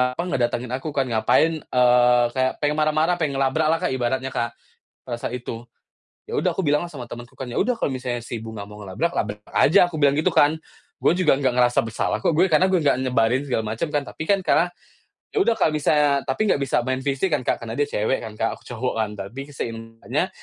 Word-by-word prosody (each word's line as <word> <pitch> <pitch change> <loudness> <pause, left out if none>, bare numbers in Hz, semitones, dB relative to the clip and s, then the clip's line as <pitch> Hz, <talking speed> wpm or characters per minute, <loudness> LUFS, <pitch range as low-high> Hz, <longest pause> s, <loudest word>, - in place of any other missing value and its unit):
apa, 170 - -2
ngedatangin 120 -5 -1
aku 135 +4 -5
kan. 135 -2 0
Ngapain, 120 +8 +3
eee, 125 -1 +4
kayak 130 0 +2
pengen 150 0 +1
marah-marah, 155 +3 +2
pengen 150 -5 -1
ngelabraklah, 155 +4 +2
Kak, - - 0
ibaratnya, 130 +1 -1
Kak, 120 0 -1 0.5
pada 120 -2 -4
saat 120 - -4
itu. 120 -1 -7 0.6
Ya - - -2
udah - - +1
aku - - -2
bilanglah 150 -1 +1
sama 125 -4 -8
temenku 120 0 -9
kan, 130 -2 -7
"Ya 120 - -5
udah 250 +5 +2
kalau 230 - -2
misalnya 125 -2 -3
si 120 +1 -6
Bunga 110 -1 -7
mau 105 - -11
ngelabrak, 130 - -1
labrak 105 0 -2
aja." 175 +3 +4
Aku 165 - -6
bilang 145 -2 +4
gitu, 155 +5 +2
kan. 160 -1 +3 0.4
"Gue 175 - +3
juga 185 - +4
nggak 130 -2 +2
ngerasa 120 -1 +4
bersalah 115 -1 -2
kok, 160 - +1
gue. 180 - +5
Karena 180 +5 +4
gue 190 - +3
nggak 145 -5 +2
nyebarin 125 -1 +2
segala 110 -3 0
macam, 135 +8 -3
kan." 145 -1 0
Tapi 155 - -7
kan 200 -1 +4
karena 175 - +3 0.6
ya 420 - +2
udah 230 -11 +2
kalo 155 - +2
misalnya 150 -2 +2
tapi 175 +11 +1
nggak 170 -9 +2
bisa 135 -3 0
main 130 0 -1
fisik 140 +6 -1
kan, 145 - +1
Kak. - - 0
Karena 110 - -5
dia 145 +3 0
cewek 110 +3 0
kan, 110 -1 -8
Kak, 115 - +1
aku - - -25
cowok, 125 +1 -2
kan. 110 - -1
Tapi 135 +9 -7
seimbangnya, 115 -4 -4
130 Hz, 225 wpm, -23 LUFS, 120-155 Hz, 0.6 s, gue